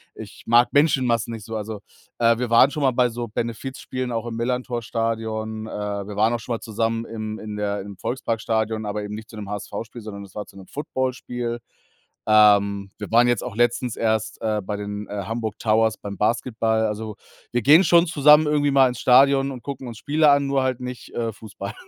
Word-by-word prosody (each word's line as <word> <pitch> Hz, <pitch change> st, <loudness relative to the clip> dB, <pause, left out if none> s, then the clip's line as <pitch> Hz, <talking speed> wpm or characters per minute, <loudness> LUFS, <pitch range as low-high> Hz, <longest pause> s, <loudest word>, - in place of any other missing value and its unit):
Ich -, -, -11 dB
mag 120 Hz, +2 st, +4 dB
Menschenmassen 125 Hz, -6 st, +2 dB
nicht 110 Hz, -3 st, -8 dB
so, 110 Hz, -, -6 dB
also, 110 Hz, 0 st, -5 dB, 0.4 s
äh, 115 Hz, -1 st, +4 dB
wir 125 Hz, 0 st, -2 dB
waren 115 Hz, +4 st, +6 dB
schon 150 Hz, -, -3 dB
mal 135 Hz, -, +4 dB
bei 125 Hz, 0 st, +2 dB
so 120 Hz, 0 st, -5 dB
Benefizspielen, 125 Hz, +3 st, -4 dB
auch 115 Hz, -1 st, -2 dB
im 115 Hz, -1 st, -5 dB
Millerntor-Stadion, 115 Hz, -2 st, -2 dB
äh, -, -, -8 dB
wir 105 Hz, 0 st, -4 dB
waren 110 Hz, +3 st, +3 dB
auch 120 Hz, -, -1 dB
schon 120 Hz, +2 st, -4 dB
mal -, -, -6 dB
zusammen 115 Hz, +1 st, -2 dB
im 110 Hz, -1 st, -6 dB
in 105 Hz, -1 st, -7 dB
der 105 Hz, -1 st, -2 dB
im 100 Hz, 0 st, -9 dB
Volksparkstadion, 110 Hz, -2 st, -2 dB
aber 105 Hz, 0 st, -3 dB
eben 105 Hz, 0 st, -5 dB
nicht 110 Hz, 0 st, -9 dB
zu -, -, -12 dB
'nem 100 Hz, -2 st, -7 dB
HSV-Spiel, 105 Hz, +3 st, -6 dB
sondern 100 Hz, -2 st, -8 dB
es 95 Hz, -, -19 dB
war 105 Hz, -, -4 dB
zu -, -, -17 dB
'nem 95 Hz, -, -12 dB
Footballspiel. 125 Hz, -4 st, -3 dB, 0.7 s
Ähm, 100 Hz, -2 st, +4 dB
wir 105 Hz, -, -7 dB
waren 120 Hz, +2 st, +5 dB
jetzt 120 Hz, -3 st, +1 dB
auch 125 Hz, -5 st, -6 dB
letztens 120 Hz, 0 st, +1 dB
erst, 110 Hz, -1 st, -1 dB
äh, 110 Hz, -1 st, 0 dB
bei 105 Hz, +2 st, -4 dB
den, 105 Hz, 0 st, -5 dB
äh, 100 Hz, -1 st, -4 dB
Hamburg 110 Hz, -1 st, -4 dB
Towers 110 Hz, 0 st, +2 dB
beim 100 Hz, -1 st, -7 dB
Basketball, 110 Hz, 0 st, +1 dB
also, 105 Hz, 0 st, -5 dB, 0.4 s
wir 120 Hz, -, 0 dB
gehen 150 Hz, -, +7 dB
schon 170 Hz, -1 st, +5 dB
zusammen 150 Hz, 0 st, +6 dB
irgendwie 145 Hz, -1 st, +2 dB
mal 135 Hz, -1 st, +6 dB
ins 125 Hz, -, -6 dB
Stadion 135 Hz, +2 st, +5 dB
und 125 Hz, -3 st, -9 dB
gucken 135 Hz, -2 st, -6 dB
uns 115 Hz, -2 st, -8 dB
Spiele 150 Hz, +1 st, +3 dB
an, 140 Hz, 0 st, +3 dB
nur 135 Hz, -1 st, +1 dB
halt 130 Hz, -1 st, -1 dB
nicht, 125 Hz, -1 st, -7 dB
äh, 115 Hz, -2 st, -2 dB
Fußball 105 Hz, -2 st, -8 dB
115 Hz, 205 wpm, -23 LUFS, 105-125 Hz, 0.7 s, gehen